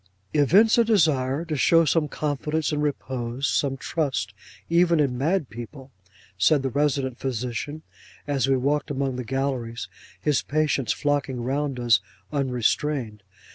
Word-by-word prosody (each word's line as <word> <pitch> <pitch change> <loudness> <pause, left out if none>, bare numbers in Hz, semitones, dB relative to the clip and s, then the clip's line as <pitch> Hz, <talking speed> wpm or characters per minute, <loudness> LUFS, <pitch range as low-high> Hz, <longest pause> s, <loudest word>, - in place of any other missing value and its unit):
'Evince 190 - +5
a - - +6
desire 155 - +2
to 160 -2 -3
show 165 +4 +4
some 155 +1 +2
confidence, 150 +2 -2
and 150 -1 -1
repose 130 -3 -2
some 135 -2 0
trust, 135 - -2 0.3
even 170 -1 +3
in 135 -4 +1
mad 155 +4 0
people,' 130 +5 -10 0.5
said 135 +9 +4
the 135 - -1
resident 140 -3 0
physician, 125 +4 -4 0.4
as 140 -2 0
we 135 -1 +3
walked 145 +3 0
along 135 -2 -1
the 125 - -4
galleries, 125 -3 -3 0.3
his 150 -3 +1
patients 150 -5 0
flocking 145 -3 -1
round 135 +1 -2
us 120 -2 +4 0.3
unrestrained. 130 -3 -1
140 Hz, 135 wpm, -25 LUFS, 125-150 Hz, 0.5 s, a